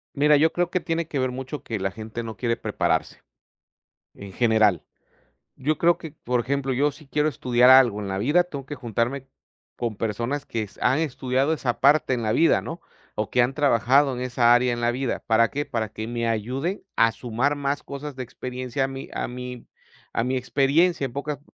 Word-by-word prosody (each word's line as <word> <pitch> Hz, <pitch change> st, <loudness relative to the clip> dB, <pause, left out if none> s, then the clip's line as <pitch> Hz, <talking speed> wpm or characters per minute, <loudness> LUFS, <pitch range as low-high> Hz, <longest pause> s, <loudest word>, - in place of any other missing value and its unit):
Mira, 150 Hz, +1 st, +5 dB
yo 160 Hz, +3 st, +3 dB
creo 175 Hz, -1 st, 0 dB
que 185 Hz, -, +1 dB
tiene 165 Hz, -1 st, -2 dB
que 145 Hz, -, -3 dB
ver 130 Hz, -1 st, 0 dB
mucho 130 Hz, +3 st, -6 dB
que 110 Hz, -3 st, -4 dB
la 95 Hz, 0 st, -1 dB
gente 110 Hz, +3 st, -7 dB
no 110 Hz, -1 st, -7 dB
quiere 115 Hz, -2 st, -1 dB
prepararse, -, -, -1 dB, 0.9 s
en 100 Hz, -1 st, -10 dB
general. 110 Hz, -8 st, +3 dB, 0.7 s
Yo 150 Hz, +4 st, -1 dB
creo 170 Hz, 0 st, +3 dB
que, 160 Hz, -, -9 dB
por 125 Hz, -4 st, -2 dB
ejemplo, 135 Hz, +2 st, -1 dB
yo 145 Hz, +4 st, +2 dB
si 145 Hz, +1 st, -16 dB
quiero 150 Hz, +2 st, +1 dB
estudiar 125 Hz, -2 st, +3 dB
algo 130 Hz, -5 st, +6 dB
en 100 Hz, -, -5 dB
la 95 Hz, 0 st, -3 dB
vida, 145 Hz, -, +3 dB
tengo 140 Hz, -7 st, -8 dB
que 145 Hz, -, -6 dB
juntarme 125 Hz, +2 st, -2 dB, 0.5 s
con 115 Hz, -3 st, -3 dB
personas 115 Hz, +7 st, -2 dB
que 110 Hz, -2 st, -3 dB
han 130 Hz, +4 st, +2 dB
estudiado 135 Hz, -1 st, 0 dB
esa 130 Hz, -6 st, -2 dB
parte 140 Hz, 0 st, +4 dB
en 120 Hz, -, -1 dB
la 110 Hz, -, 0 dB
vida, 165 Hz, -, +4 dB
¿no?, 165 Hz, +2 st, -7 dB, 0.3 s
o 105 Hz, -1 st, -2 dB
que 125 Hz, -, +3 dB
han 125 Hz, +2 st, +1 dB
trabajado 135 Hz, 0 st, +3 dB
en 125 Hz, -, -5 dB
esa 120 Hz, -1 st, +3 dB
área 120 Hz, +1 st, +3 dB
en 120 Hz, -, -4 dB
la 120 Hz, 0 st, +2 dB
vida. 130 Hz, +1 st, -3 dB
¿Para 115 Hz, 0 st, +4 dB
qué? 145 Hz, +1 st, -3 dB
Para 115 Hz, -4 st, -3 dB
que 110 Hz, +1 st, -6 dB
me 115 Hz, 0 st, -2 dB
ayude 130 Hz, -, -2 dB
a 115 Hz, 0 st, +4 dB
sumar 120 Hz, +5 st, -1 dB
más 140 Hz, 0 st, -2 dB
cosas 140 Hz, 0 st, -7 dB
de 130 Hz, -, -4 dB
experiencia 125 Hz, +1 st, -4 dB
a -, -, -3 dB
mi 135 Hz, 0 st, -7 dB
a -, -, -2 dB
mi 125 Hz, 0 st, -7 dB, 0.5 s
a 115 Hz, -, 0 dB
mi 130 Hz, +2 st, -1 dB
experiencia, 140 Hz, +5 st, +2 dB
en 125 Hz, -, -6 dB
pocas 140 Hz, 0 st, -4 dB
130 Hz, 205 wpm, -24 LUFS, 115-145 Hz, 0.9 s, algo